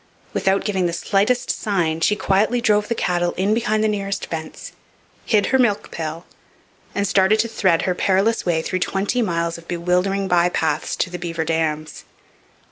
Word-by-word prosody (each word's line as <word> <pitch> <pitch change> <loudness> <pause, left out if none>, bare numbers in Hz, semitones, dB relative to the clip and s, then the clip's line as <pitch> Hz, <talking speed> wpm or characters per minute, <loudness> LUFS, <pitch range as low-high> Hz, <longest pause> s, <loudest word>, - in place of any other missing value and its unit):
Without 195 0 +1
giving 190 -4 0
the 170 - -3
slightest 205 +7 +1
sign 170 -6 -1
she 210 - +3
quietly 210 +4 +1
drove 210 -3 +2
the 235 - -1
cattle 175 -3 0
in 195 +3 +1
behind 215 -1 +1
the - - +3
nearest 200 -2 -2
fence, 160 -1 -7 0.6
hid 210 -3 +3
her 265 - +5
milk 220 -5 +1
pail, 160 +1 -5 0.7
and 200 0 0
started 190 +3 +3
to 230 - +1
thread 190 -7 +1
her 185 - +1
perilous 195 +5 +1
way 165 -2 0
through 185 - -2
twenty 200 +7 0
miles 170 -4 -1
of 170 - -17
bewildering 180 +3 0
bypaths 170 -3 +1
to 175 - -1
the 180 - -5
Beaver 165 -1 -3
Dams. 155 -1 -2
190 Hz, 170 wpm, -21 LUFS, 170-210 Hz, 0.7 s, her